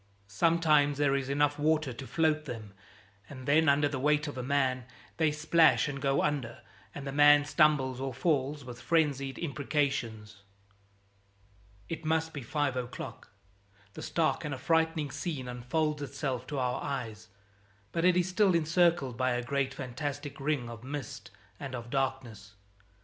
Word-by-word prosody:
Sometimes 150 - +3
there 145 -1 +2
is 135 -1 -2
enough 145 +1 +1
water 155 -3 +1
to 130 +2 -8
float 155 -2 +1
them, 110 -6 -7 0.6
and 130 -1 -9
then 155 +2 +4
under 145 +1 +4
the 140 -2 -3
weight 150 +2 +2
of 145 - -6
a 130 - -4
man 130 -2 0 0.3
they 160 -2 +3
splash 155 +2 +4
and 140 -2 -5
go 135 0 +1
under, 135 -6 -2 0.3
and 140 - -6
the 135 - -3
man 145 +1 +6
stumbles 140 -3 +2
or 135 0 -2
falls, 140 0 -1
with 120 -1 -9
frenzied 140 -5 +1
imprecations. 135 -8 -2 1.5
It 165 0 -5
must 160 +1 0
be 145 - -5
five 140 +2 -1
o'clock. 125 -1 -6 0.6
The - - -8
stark 165 -1 0
and 150 -3 -3
affrighting 160 +1 +1
scene 145 -7 -4
unfolds 145 +5 -2
itself 135 -2 -4
to 145 - -4
our 125 -1 -1
eyes, 110 -5 -5 0.6
but 165 - -1
it 180 0 +4
is 180 0 +2
still 185 0 +3
encircled 165 -5 +2
by 130 0 +1
a 120 0 -2
great 135 +1 -1
fantastic 140 +3 -5
ring 140 -3 -1
of 115 -1 -9
mist 140 -2 -6 0.3
and 135 -2 -5
of 120 -1 -8
darkness. 130 -7 -3
140 Hz, 155 wpm, -30 LUFS, 130-155 Hz, 1.5 s, man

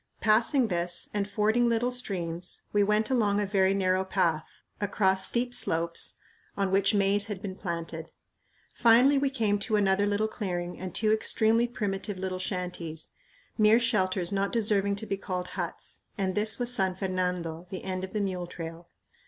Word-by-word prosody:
Passing 230 +3 +3
this 175 -1 0
and 205 -1 -1
fording 220 +4 +2
little 235 +2 +1
streams, 180 -8 -3
we 205 - +3
went 210 +3 +1
along 210 -5 +2
a 205 - +1
very 195 -1 +2
narrow 185 -1 +1
path, 175 -5 0 0.4
across 190 -2 +2
steep 245 +1 0
slopes, 170 -8 +1 0.4
on 195 -1 0
which 195 +2 +3
maize 200 +1 +2
had 205 -3 -4
been 190 -2 -6
planted. 165 -3 -5 0.6
Finally 245 +4 +5
we 275 0 +1
came 220 -6 0
to 215 +2 -1
another 200 0 +2
little 205 +1 +1
clearing 180 -5 -4
and 185 -2 -6
two 215 -1 +2
extremely 220 +1 +3
primitive 200 -4 -3
little 185 0 -3
shanties, 180 -4 -4 0.5
mere 215 +2 +6
shelters 190 -6 0
not 200 0 0
deserving 205 -3 +1
to 205 - -4
be 195 - -2
called 180 -2 -4
huts; - - -5 0.2
and 190 -2 -1
this 215 +2 +2
was 245 0 -1
San 190 -5 0
Fernando, 180 -3 -3
the 190 -2 -6
end 185 -1 -3
of 190 - -5
the 210 - -1
mule 185 -3 -2
trail. 165 0 -8
195 Hz, 170 wpm, -28 LUFS, 185-215 Hz, 0.6 s, mere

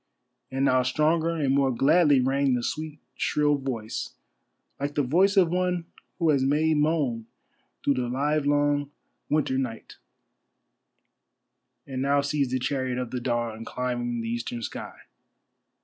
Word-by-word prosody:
And 135 +1 0
now 130 -1 +4
stronger 155 +6 +1
and 140 -4 +1
more 140 -1 +3
gladly 140 +3 +4
rang 135 0 +2
the 120 - -2
sweet 155 +2 -4 0.2
shrill 150 0 +1
voice, 130 -6 -4 0.6
like 145 +1 -3
the 145 - +2
voice 185 - +3
of 180 -4 +5
one 180 -1 0 0.3
who 165 -4 +3
has 140 -3 +2
made 150 +3 +2
moan 145 -7 0 0.6
through 140 - +3
the 125 -2 -2
livelong 145 +1 +1 0.4
winter 140 -3 +1
night, 115 -4 -5 1.9
and 130 -2 -4
now 140 +1 +2
sees 140 -1 0
the 130 - 0
chariot 130 -1 -2
of 125 -2 -4
the 125 - -2
dawn 120 -2 -2
climbing 120 -1 -3
the 115 - -4
eastern 120 0 -4
sky. - - -7
140 Hz, 140 wpm, -26 LUFS, 125-150 Hz, 1.9 s, of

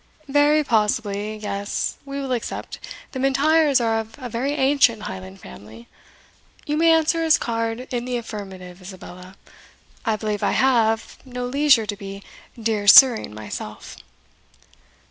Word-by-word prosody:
"Very 295 +2 +3
possibly 215 -3 -1
yes, 205 -1 -3
we 275 0 -5
will 270 -2 -4
accept 240 -3 -4 0.3
the 260 - -6
M'Intyres 280 +2 +3
are 225 -1 0
of 225 0 -8
a 255 -3 -7
very 250 +5 -2
ancient 265 -6 +2
Highland 95 - -8
family. 110 - -13 0.8
You 300 - -2
may 330 +1 +4
answer 325 +1 +2
his 320 -1 +4
card 230 0 -3
in 240 0 -2
the 250 -1 -2
affirmative, 190 -5 -9
Isabella; 185 0 -11 0.7
I 220 -2 0
believe 210 -1 -3
I - - +1
have, 225 -4 +1
no 250 -1 -6
leisure 275 -2 +3
to 205 - -4
be 195 -1 -9 0.4
Dear 215 -2 -2
Sirring 230 - +7
myself." 110 0 -8
230 Hz, 140 wpm, -22 LUFS, 205-270 Hz, 0.8 s, Sirring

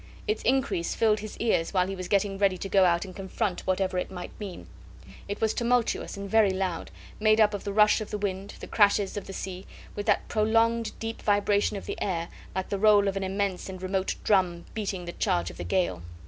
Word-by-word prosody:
Its 430 - 0
increase 260 -10 0
filled 215 -1 +3
his 215 0 -8
ears 210 -5 0
while 180 -1 +4
he 195 +1 -4
was 185 -1 -6
getting 200 0 +1
ready 195 -2 +3
to 195 - -5
go 195 -1 +4
out 170 +1 +2
and 185 - -10
confront 195 0 -3
whatever 185 -1 +1
it - - -3
might 180 -2 -7
mean. 200 -4 -7 0.6
It 205 - -4
was 220 -1 +1
tumultuous 240 -3 0
and 200 0 -5
very 215 0 +4
loud 190 -3 -2 0.3
made 215 0 +4
up 210 -1 +5
of 205 - -5
the 200 - -2
rush 210 +2 +4
of 215 - -5
the 210 - -3
wind, 195 -1 -4
the - - -5
crashes 205 -2 +3
of 205 - -5
the - - -6
sea, 185 -1 -6 0.3
with 205 +1 -4
that 210 - +2
prolonged 225 +1 +2
deep 225 0 -5
vibration 205 0 +2
of - - -8
the - - -5
air, 170 -4 -1 0.3
like 190 0 -2
the 200 - -2
roll 205 -1 +5
of 195 - 0
an 195 - -2
immense 195 -1 -2
and 185 -1 -7
remote 190 +1 -1
drum 180 -4 +2
beating 195 -4 -3
the 175 - -5
charge 85 0 0
of - - -14
the - - -5
gale. 90 - 0
200 Hz, 225 wpm, -27 LUFS, 185-215 Hz, 0.6 s, up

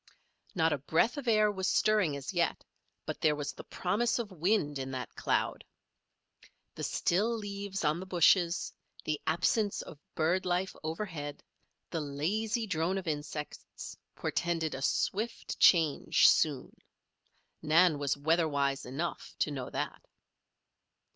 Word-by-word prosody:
Not 160 -3 +3
a 145 - -2
breath 165 - +2
of 280 -3 -5
air 215 -2 +4
was 190 -2 -2
stirring 205 -9 +2
as 140 +6 -6
yet; 170 -2 0 0.4
but - - -5
there 150 -1 +3
was 145 -1 -4
the - - -10
promise 210 +6 0
of 230 -4 -4
wind 170 -5 0
in 135 0 -4
that 130 -1 -5
cloud. - - -1 1.1
The - - -7
still 215 +7 +1
leaves 200 -3 -4
on 150 +3 +2
the 190 - -7
bushes, 175 0 +3 0.3
the 155 -1 -1
absence 195 +6 +1
of 150 - -11 0.2
bird 170 +4 +1
life 180 +1 -1
overhead, 160 -3 -5 0.5
the 165 - -2
lazy 205 +11 -1
drone 180 0 0
of 190 -2 -5
insects, 150 -1 -5 0.2
portended 165 -2 -1
a 135 - -5
swift 215 +10 -1
change 160 -5 +5
soon. - - +2 0.9
Nan 160 0 +4
was 145 -1 0
weather 160 +3 +2
wise 140 -3 -1
enough 150 +7 -4
to 150 - 0
know 130 -3 -4
that. - - -4
170 Hz, 140 wpm, -31 LUFS, 150-195 Hz, 1.1 s, change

